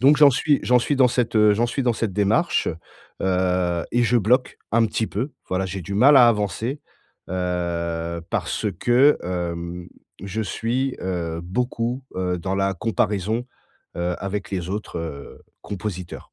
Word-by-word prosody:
Donc 140 +3 +6
j'en 145 -1 +8
suis 145 +2 +2
j'en 125 0 +4
suis 140 +4 0
dans 130 -2 +5
cette, 120 -2 0
heu, 105 -1 +6
j'en 115 +3 +1
suis 130 +3 -2
dans 120 -2 +2
cette 110 -2 -2
démarche, 105 - +2 0.5
heu 90 -2 +1
et 120 - +3
je 120 +1 +3
bloque 125 +5 +1
un 115 0 +4
petit 110 +1 -1
peu, 125 +9 -3 0.2
voilà, 95 +1 0
j'ai 95 +1 -5
du 100 +5 -5
mal 135 +7 +6
à 120 -2 +8
avancer, 110 +5 -1 0.5
heu, 85 -2 -2
parce - - -1
que, 130 +5 +5
hem, 85 0 -4 0.3
je 100 +3 -3
suis, 125 +5 -1
heu, 85 -3 -3
beaucoup, 120 +6 -2
heu, 90 -1 -1
dans 95 +3 -2
la 95 0 +1
comparaison, 110 +3 -1 0.5
heu, 90 +1 -1
avec 100 +1 -4
les 90 -3 -3
autres, 105 -3 -4
heu, 75 -4 -7 0.2
compositeurs 95 -3 -6
100 Hz, 160 wpm, -23 LUFS, 90-120 Hz, 0.5 s, j'en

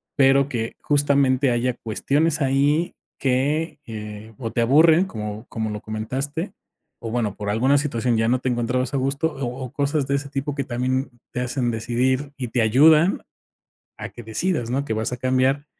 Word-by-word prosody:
pero 135 0 +4
que, 115 -4 -3
justamente, 140 -2 +2
haya 120 +1 +1
cuestiones 145 +8 0
ahí 140 +5 +2 0.3
que, 140 +5 0
eh, 105 0 -8
o 115 -3 -4
te 120 - 0
aburren, 155 +8 +5
como 105 - -6
como 110 -1 -3
lo 105 0 -5
comentaste 135 - -4 0.5
o, 115 - -5
bueno, 110 -4 -1
por 105 -1 -4
alguna 130 +7 +3
situación 125 -5 0
ya 115 0 +2
no 125 +2 +2
te 130 - -1
encontrabas 125 +2 -1
a - - +1
gusto. 140 +4 0
O 135 -2 -3 0.2
o 125 - -9
cosas 145 0 0
de 140 - +1
ese 140 0 -3
tipo 140 +1 -3
que 140 - -1
también 130 +2 -1 0.2
te 125 - -2
hacen 125 -1 -1
decidir 130 +5 0
y 125 -3 -4
te 120 +1 +1
ayudan 150 - +5 0.8
a - - -7
que 120 - -11
decidas, 120 - -2
¿no?, 135 +3 0
que 125 - -3
vas 110 +3 -2
a - - -2
cambiar, 130 +3 +1
130 Hz, 180 wpm, -23 LUFS, 115-140 Hz, 0.8 s, aburren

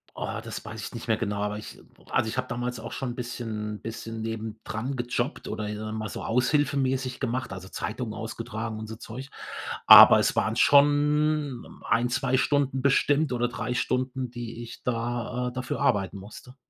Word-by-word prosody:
Oh, - - -3
das - - -7
weiß 110 0 -7
ich - - -6
nicht 115 0 -7
mehr 110 - +3
genau, 105 -2 -2
aber 105 0 -1
ich 105 - -9 0.3
also, - - +1
ich 110 - -3
habe 130 0 -1
damals 125 0 -3
auch 115 - -7
schon 135 - -3
'n - - -7
bisschen 115 -4 -4
'n - - -21
bisschen 115 0 -6
nebendran 110 +3 -4
gejobbt 120 +3 -2
oder, 105 -1 -3
ich 105 - -4
sage 110 0 -5
mal 110 -1 -3
so, - - -6
aushilfemäßig 130 0 +1
gemacht, 130 -4 -2
also, 95 0 -8
Zeitungen 110 +2 -4
ausgetragen 110 0 -5
und 110 0 -6
so 110 0 -7
Zeug. 125 +4 -8 0.6
Aber - - +11
es - - +2
waren 110 +2 +1
schon 145 0 +3
1, 120 +1 +3
2 125 +1 +1
Stunden 140 -1 +1
bestimmt 140 +1 +3
oder 120 0 0
3 125 0 -3
Stunden, 130 +1 -1
die 120 -1 -6
ich 115 - -10
da 120 +1 -2
äh, - - -9
dafür 130 0 -4
arbeiten 100 -1 +1
musste. 110 +6 -12
120 Hz, 185 wpm, -27 LUFS, 110-130 Hz, 0.6 s, Aber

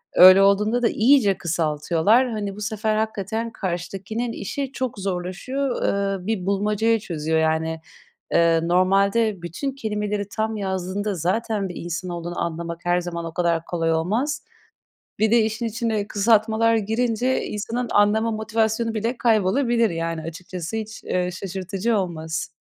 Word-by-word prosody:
Öyle 185 +2 +9
olduğunda 210 +5 +3
da - - +4
iyice 225 -5 +4
kısaltıyorlar. 170 - +1
Hani, 205 -2 -3
bu 210 - -9
sefer 215 +1 -1
hakikaten 220 +1 -2
karşıdakinin 195 +5 -4
işi 275 +6 -4
çok 255 -6 -3
zorlaşıyor. 195 +9 -2 0.4
Eee, 185 - -10
bir 215 -5 -1
bulmacayı 210 +3 +1
çözüyor 160 -4 -1
yani. 160 0 0 0.5
Eee, 165 -1 +4
normalde 195 +3 +2
bütün 190 - -4
kelimeleri 210 -4 -3
tam 220 +1 -2
yazdığında 195 +1 -2
zaten 195 +4 -1
bir 180 - -8
insan 175 +1 -4
olduğunu 175 0 -4
anlamak 170 0 -4
her 175 0 +2
zaman 170 -1 -5
o 165 -1 -6
kadar 170 -2 +1
kolay 165 -2 -1
olmaz. 230 - -1 0.8
Bir 220 0 +3
de 235 - +6
işin 220 +2 -1
içine 225 -2 -1
kısaltmalar 220 +2 +3
girince 230 +3 0
insanın 230 +4 -3
anlama 215 +2 +3
motivasyonu 220 +1 0
bile 230 +3 -1
kaybolabilir 230 +1 +2
yani. 165 -1 -3
Açıkçası, 170 +4 -6
hiç, 220 0 -6
eee, 180 0 -1
şaşırtıcı 195 +4 -2
olmaz. 160 -3 -3
205 Hz, 140 wpm, -23 LUFS, 175-225 Hz, 0.8 s, Öyle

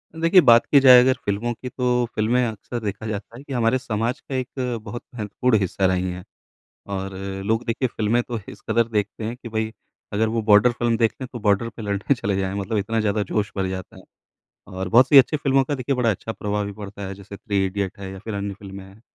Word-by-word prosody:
देखिए, 165 +3 +5
बात 120 -5 +6
की 140 - +5
जाए 130 -2 +9
अगर 130 +1 +4
फ़िल्मों 105 +4 -1
की 125 +2 -8
तो 125 -1 0
फ़िल्में 120 +4 +2
अक्सर 115 +2 -5
देखा 105 +1 -4
जाता 110 +2 -6
है 135 - -11
कि 145 - -7
हमारे 120 0 +2
समाज 120 +1 -2
का 135 - -7
एक 125 -2 -3
बहुत 120 +2 -7
महत्वपूर्ण 110 +2 +1
हिस्सा 95 0 -1
रही 95 0 +1
है। 90 0 -7 0.7
और 95 0 -4 0.3
लोग 110 +3 0
देखिए 120 +3 0
फ़िल्में 115 +3 +1
तो 120 -1 -5
इस - - -10
कदर 115 -1 +2
देखते 110 0 -2
हैं 115 +3 -4
कि 120 - -9
भई, 110 0 -2 0.4
अगर 110 +2 +1
वो 115 0 -1
बॉर्डर 105 +2 +6
फ़िल्म 120 -1 0
देखते 115 +3 0
हैं, - - -7
तो 120 - -5
बॉर्डर 105 +1 +1
पे 115 0 -10
लड़ने 100 +5 0
चले 100 -5 -2
जाएँ 95 0 -2
मतलब 110 +3 -2
इतना 110 +3 -1
ज़्यादा 105 0 0
जोश 100 +1 -2
भर 95 -1 0
जाता 95 -1 -6
है, - - -13 0.6
और 95 0 -5
बहुत 125 +7 +6
सी 140 - +9
अच्छी 135 +3 +5
फ़िल्मों 135 -2 +2
का 145 - -2
देखिए 135 +1 -1
बड़ा 120 -2 +2
अच्छा 110 +2 -4
प्रभाव 105 -1 -2
भी 100 - -5
पड़ता 100 -1 -8
है, 95 - -6
जैसे 100 +1 -11
थ्री 100 -2 -1
इडियट 100 +1 -3
है 95 -1 -7
या 95 - -8
फिर 105 +2 -6
अन्य 100 0 -3
फ़िल्में 100 -1 -10
हैं। 95 +3 -16
110 Hz, 235 wpm, -23 LUFS, 100-120 Hz, 0.7 s, जाए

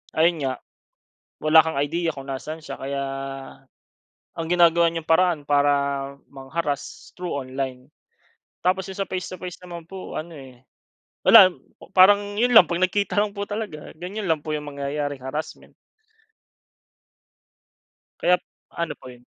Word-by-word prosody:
ayon 165 +1 +3
nga, 130 - 0 0.9
wala 155 +1 +6
kang 160 -3 -3
idea 165 +4 0
kung 135 -3 -8
nasaan 140 +4 -5
siya, 140 -4 -8
kaya, 140 +1 -3 1.4
ang 165 - -2
ginagawa 170 -1 +5
niyang 165 -1 -4
paraan 165 -2 +3
para 145 0 +3 0.6
mang-harass, 140 +2 -5
through 180 -1 -5
online. 130 -1 -5 0.7
Tapos 190 +1 +1
'yong 190 - -8
sa - - -29
face 185 -1 -4
to 185 - -7
face 180 -1 -8
naman 175 -2 -9
po, 190 +2 -8
ano 170 +2 -6
eh, 130 -4 -13 0.6
wala, 200 -5 +10 0.5
parang 205 +2 +6
'yon 245 +2 +2
lang, 220 -6 +9
'pag 170 +1 -1
nagkita 200 +2 +1
lang 205 0 +2
po 200 0 -4
talaga, 205 -8 -5
ganyan 190 +3 -5
lang 160 -2 +1
po 155 - -2
'yong 150 -1 -3
mangyayaring 140 0 -4
harassment. 150 +4 -6 2.5
Kaya't 180 0 +3 0.3
ano 170 -1 -3
po 130 - -11
'yon? 125 0 -17
165 Hz, 140 wpm, -24 LUFS, 140-185 Hz, 2.5 s, wala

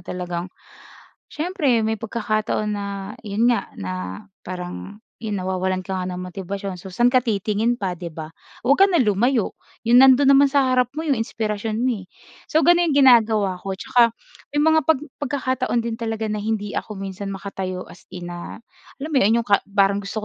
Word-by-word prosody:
talagang 180 0 -5 0.8
siyempre 295 -9 0
may 220 -1 -1
pagkakataon 215 -1 -1
na 205 -1 -3 0.3
'yon 210 +2 -1
nga - - -2
na 90 0 -5 0.2
parang 185 +4 -7 0.2
'yon 210 -4 -2
nawawalan 185 0 -1
ka 190 - -4
nga 185 0 -3
ng 180 0 -5
motibasyon, 195 +1 -5
so 190 +2 -10
saan 240 +5 +3
ka 250 0 +3
titingin 220 +1 0
pa, 190 -3 -1
'di 170 -1 -8
ba? 155 -1 -7 0.4
Huwag 285 +9 +6
ka - - +6
na 345 - +3
lumayo, 225 +1 +1 0.3
'yong 240 +1 +5
nandun 265 +1 +6
naman 275 0 +6
sa 275 -1 +3
harap 250 -1 +2
mo 305 - -4
'yong 275 -4 +2
inspirasyon 220 -1 -2
mo, 240 -6 0
eh. - - -12 0.5
So 315 - +4
ganun 345 -2 +4
yung 285 - +3
ginagawa 215 -6 +4
ko 195 - -3
tsaka 235 +1 +3 0.4
may 295 - +1
mga 315 +1 +4
pag 320 -4 +3 0.2
pagkakataon 260 -3 -1
din 230 0 -3
talaga 225 -1 -3
na 210 -1 -3
hindi 210 -1 -2
ako 210 -3 -4
minsan 195 0 -5
makatayo 190 -2 -5
as 180 - -15
in 180 -1 -7
na 175 0 -7 0.4
alam 295 - -4
mo - - +3
'yon, 215 +3 +4
'yong 230 - -7
ka 200 - +4
parang 200 0 +2
gusto 195 +2 -5
215 Hz, 185 wpm, -22 LUFS, 190-245 Hz, 0.8 s, Huwag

